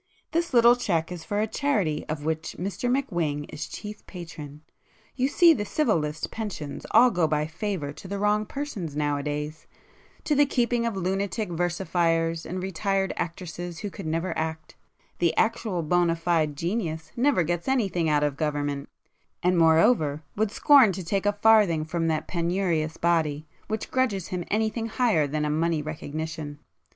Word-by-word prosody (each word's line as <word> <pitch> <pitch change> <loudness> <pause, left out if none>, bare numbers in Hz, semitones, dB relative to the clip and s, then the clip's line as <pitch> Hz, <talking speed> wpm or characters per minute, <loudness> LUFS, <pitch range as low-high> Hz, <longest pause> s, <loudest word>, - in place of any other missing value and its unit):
This 340 +1 0
little 240 -1 +6
cheque 175 -9 -1
is 175 -2 -6
for 205 +2 -2
a - - +2
charity 210 - 0
of 150 -1 -4
which 160 0 -2
Mr 195 +6 -2
McWhing 175 - -1
is - - -5
chief 210 0 -8
patron,—you 165 - -7
see 335 +3 +6
the 210 - -2
Civil 220 - +1
List 150 0 -4
pensions 185 -11 -5
all 250 +1 +6
go 175 -5 +2
by 150 0 0
favour 165 -3 -4
to 155 +5 -11
the 200 +1 -3
wrong 210 +1 +1
persons 215 - -5
nowadays; 150 +1 -2 0.6
to 300 - +1
the 290 0 +4
keeping 240 -2 +1
of 230 - -2
lunatic 195 +3 -1
versifiers 170 -1 0
and 185 +1 -4
retired 195 +1 -1
actresses 175 0 -5
who 205 - -4
never 165 +3 -1
could - - -4
act—the 160 +1 -4
actual 220 -6 +1
bona 175 +1 +2
fide 165 -3 0
'genius' 165 -2 -3
never 250 -6 +3
gets 175 +1 -2
anything 195 -11 +1
out 150 -1 +3
of 145 -2 0
Government, 145 -2 -2 0.5
and 180 +1 +3
moreover 160 -2 +4
would 215 0 +1
scorn 265 0 +6
to 185 +1 -5
take 195 +3 0
a 205 - +3
farthing 205 -7 +4
from 165 +1 -1
that 155 -1 -1
penurious 170 -2 -1
body, 160 -3 +1 0.2
which 220 0 -4
grudges 230 -9 0
him 180 -1 -3
anything 220 +1 0
higher 220 - +2
than 150 +1 -1
a - - 0
money 160 0 0
recognition. 155 0 -5
175 Hz, 160 wpm, -26 LUFS, 155-210 Hz, 0.6 s, little